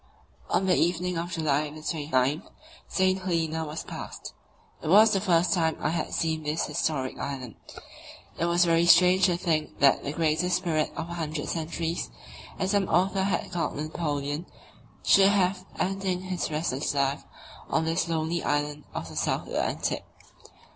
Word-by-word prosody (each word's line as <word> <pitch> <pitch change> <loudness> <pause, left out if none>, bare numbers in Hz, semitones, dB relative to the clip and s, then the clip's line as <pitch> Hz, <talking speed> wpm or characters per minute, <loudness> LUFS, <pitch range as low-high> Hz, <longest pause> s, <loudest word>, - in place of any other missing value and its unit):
On 190 - +1
the 185 -1 +4
evening 180 +1 +1
of 170 +1 -3
July 150 -2 0
29 150 -2 -1 0.5
St. 190 0 +2
Helena 165 -3 -1
was 150 +1 -5
passed. - - -8 0.5
It - - -6
was 210 +6 +7
the 195 - +1
first 180 -1 +3
time 160 -4 +1
I - - 0
had 165 -2 -2
seen 160 -1 -1
this 150 +1 -1
historic 135 -5 -2
island. 130 -5 -5 0.9
It 170 - +1
was 175 +1 +3
very 170 0 +3
strange 180 +2 +6
to 175 -2 +1
think 160 -4 -1
that 140 -1 +4
"the 140 - -3
greatest 165 +3 +1
spirit 165 -4 -1
of 170 0 -4
a - - -4
hundred 155 -3 -3
centuries," 165 +1 -3 0.5
as 190 0 0
some 200 -2 +1
author 190 +3 +2
has 195 - -1
called 170 -4 -2
Napoleon, 150 0 -3 0.6
should 195 0 +6
have 185 -2 +1
ending 190 -1 -1
his 185 -1 -3
restless 150 -3 -1
life 140 +1 0 0.5
on 160 - +1
this 165 +1 0
lonely 165 +1 -1
island 145 0 -1
of - - -4
the - - -10
South - - 0
Atlantic. - - -1
165 Hz, 160 wpm, -27 LUFS, 155-180 Hz, 0.9 s, was